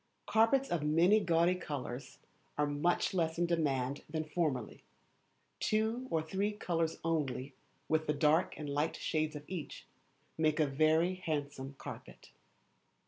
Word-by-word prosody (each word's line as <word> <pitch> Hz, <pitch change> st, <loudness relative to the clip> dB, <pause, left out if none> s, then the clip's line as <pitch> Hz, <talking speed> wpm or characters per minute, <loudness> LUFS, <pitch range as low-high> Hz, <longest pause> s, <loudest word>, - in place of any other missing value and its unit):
Carpets 260 Hz, +5 st, +3 dB
of 175 Hz, -, +1 dB
many 165 Hz, +8 st, +4 dB
gaudy 170 Hz, -2 st, +3 dB
colours 140 Hz, -7 st, -5 dB, 0.4 s
are 150 Hz, -, +3 dB
much 145 Hz, +7 st, +1 dB
less 165 Hz, -3 st, 0 dB
in 175 Hz, -, +2 dB
demand 140 Hz, -5 st, 0 dB
than 155 Hz, 0 st, -2 dB
formerly. 150 Hz, -6 st, -2 dB, 0.8 s
Two 220 Hz, +4 st, 0 dB
or 160 Hz, -6 st, 0 dB
three 195 Hz, +6 st, -1 dB
colours 165 Hz, -5 st, -1 dB
only, 145 Hz, -4 st, -1 dB, 0.3 s
with 155 Hz, 0 st, +1 dB
the 150 Hz, -, +2 dB
dark 150 Hz, +4 st, +3 dB
and 150 Hz, -, -5 dB
light 145 Hz, +3 st, 0 dB
shades 155 Hz, -1 st, -1 dB
of 145 Hz, -, -6 dB
each, 170 Hz, -7 st, -6 dB, 0.5 s
make 155 Hz, 0 st, +2 dB
a 155 Hz, -, +5 dB
very 155 Hz, +5 st, +3 dB
handsome 145 Hz, -6 st, -4 dB
carpet. -, -, -10 dB
160 Hz, 140 wpm, -33 LUFS, 145-175 Hz, 0.8 s, a